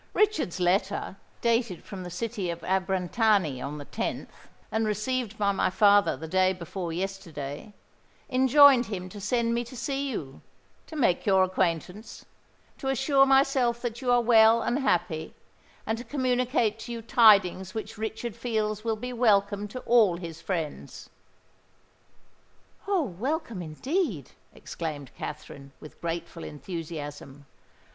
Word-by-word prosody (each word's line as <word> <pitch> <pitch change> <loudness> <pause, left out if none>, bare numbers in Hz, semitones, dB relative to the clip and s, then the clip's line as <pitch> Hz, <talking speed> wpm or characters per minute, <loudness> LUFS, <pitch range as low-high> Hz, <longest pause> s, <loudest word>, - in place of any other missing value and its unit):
"Richard's 405 - +1
letter, 190 +2 0 0.3
dated 230 -6 0
from 195 -3 -8
the 180 - -6
city 205 0 -3
of 170 0 -5
Abrantani 190 - +1
on 145 +3 -5
the 145 - -8
10th, - - -4 0.4
and 220 0 0
received 215 +1 -2
by 200 -1 +2
my 195 - +1
father 205 - +4
the 160 +4 -7
day 185 +2 +2
before 175 0 -6
yesterday, 165 -4 -5 0.6
enjoined 265 -1 +6
him 185 -3 -5
to 205 +2 -10
send 230 +2 0
me 235 +1 0
to 240 +2 -11
see 275 +2 -2
you—to 155 - -10
make 230 - +1
your 190 -1 +5
acquaintance—to 185 - -4
assure 270 +1 +3
myself 270 -3 +3
that 240 -1 -4
you 255 - -2
are 245 0 +5
well 225 0 +6
and 245 - 0
happy—and 180 - -3
to - - -6
communicate 250 -3 0
to 230 +2 -8
you 230 -1 -5
tidings 195 -5 +4
which 220 - -5
Richard 220 0 -4
feels 215 -3 -2
will 225 -1 0
be 250 +3 -6
welcome 205 -3 +2
to 255 +5 -7
all 220 -7 +4
his 165 -2 -8
friends." 165 -5 -5 1.8
"Oh! 390 -5 +2
welcome 245 - -3
indeed!" 185 - -2 0.2
exclaimed 145 -5 -6
Katherine, 140 -2 -8
with 150 - -13
grateful 170 0 -5
enthusiasm. 145 -3 -7
210 Hz, 135 wpm, -27 LUFS, 175-240 Hz, 1.8 s, enjoined